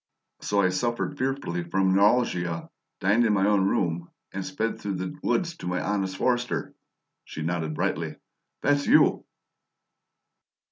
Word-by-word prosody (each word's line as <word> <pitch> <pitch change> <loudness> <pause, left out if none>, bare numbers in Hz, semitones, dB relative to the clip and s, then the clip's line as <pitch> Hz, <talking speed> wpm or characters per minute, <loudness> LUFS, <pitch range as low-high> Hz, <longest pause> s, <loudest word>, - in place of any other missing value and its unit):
So 100 0 +1
I 95 - +4
'suffered 120 +9 -1
fearfully 130 -10 -1
from 95 +2 +1
neuralgia,' 95 -5 +2 0.3
dined 105 +5 +4
in 110 -2 +3
my 95 -1 +3
own 100 -2 +3
room, 85 -2 0 0.2
and 95 0 -3
sped 95 +5 -2
through 100 -2 -2
the 95 +10 -4
woods 170 -3 0
to - - -7
my 90 0 0
honest 95 -2 -1
forester." 125 -1 0 0.5
She 80 - -7
nodded 80 -2 -2
brightly. - - -1 0.5
"That's 145 0 +2
YOU!" - - +5
95 Hz, 140 wpm, -26 LUFS, 90-120 Hz, 0.5 s, YOU